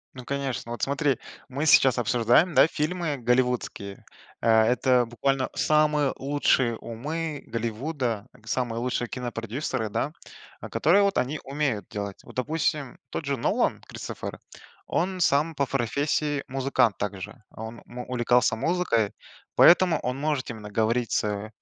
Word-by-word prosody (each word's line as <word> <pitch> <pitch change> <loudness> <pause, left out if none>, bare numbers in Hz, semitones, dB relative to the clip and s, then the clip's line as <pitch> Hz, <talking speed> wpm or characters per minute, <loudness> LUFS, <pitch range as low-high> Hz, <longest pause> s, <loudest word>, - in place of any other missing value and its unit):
Ну, 125 -1 -9
конечно, 135 -4 -3
вот 120 - -5
смотри: 140 -2 +1 0.3
мы 140 +4 -2
сейчас 135 -4 +6
обсуждаем, 120 - +3
да, 135 +2 +7
фильмы 160 -1 -2
голливудские, 125 -5 -1 0.4
э, - - -1
это 120 +3 +4
буквально 135 +3 0
самые 150 -2 +3
лучшие 135 -4 +1
умы 150 +8 -5
Голливуда, 115 0 -3
к 115 -3 -20
самые 120 -2 -1
лучшие 120 0 -1
кинопродюсеры, 115 -1 -3
да, 145 +8 -2 0.5
а - - -7
которые, 175 +7 +4
вот, 200 -1 +1
они 135 +4 0
умеют 135 -6 -2
делать. 100 -1 -5
Вот, - - -14
допустим, 150 0 -1
тот 160 - -4
же 140 -1 -1
Нолан 115 - +1
Кристофер, - - -7 0.5
он 185 +2 -1
сам 155 0 +2
по 140 - +1
профессии 140 +3 0
музыкант 130 -5 +1
также, 105 +3 -5
он, 110 +1 -8
м, 120 - -9
увлекался 120 -2 +2
музыкой, 115 - +1 0.4
поэтому 175 -2 +6
он 125 +1 -3
может 150 -3 -1
именно 105 -3 -8
говорить 115 +3 0
с, 105 0 -1
130 Hz, 140 wpm, -26 LUFS, 115-150 Hz, 0.5 s, да